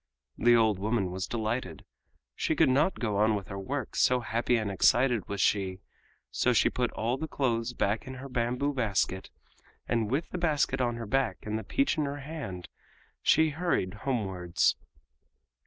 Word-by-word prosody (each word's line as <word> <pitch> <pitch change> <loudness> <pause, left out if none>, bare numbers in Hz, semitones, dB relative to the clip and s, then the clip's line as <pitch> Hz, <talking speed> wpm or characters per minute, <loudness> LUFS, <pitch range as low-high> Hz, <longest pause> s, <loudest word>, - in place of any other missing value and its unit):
The 120 +1 +5
old 110 -4 +3
woman 100 -2 0
was 95 +1 -3
delighted. 110 - -3 0.5
She - - -1
could - - +4
not 150 +8 +2
go 105 -4 -1
on 110 +1 +3
with 100 -2 -5
her 100 -1 -5
work, 135 +8 -4
so 125 0 +3
happy 120 +1 0
and 110 -3 -1
excited 120 +3 +3
was 100 - -3
she, 95 -2 +1 0.5
so - - +2
she - - +3
put - - 0
all 120 +4 -1
the 160 - -4
clothes 125 -4 -1
back 110 0 -1
in 130 - -6
her 130 +2 -8
bamboo 125 +3 -1
basket, 100 -6 -1 0.6
and 115 -3 0
with 145 +7 -1
the 180 - -3
basket 150 -5 +1
on 120 -1 0
her 115 -1 -5
back 135 +2 -1
and 105 0 -2
the - - -7
peach 275 - 0
in 150 - +1
her 140 +1 -4
hand 135 - -6 0.5
she 160 0 +4
hurried 155 - -1
homewards. 95 -7 0
115 Hz, 175 wpm, -29 LUFS, 100-135 Hz, 0.6 s, The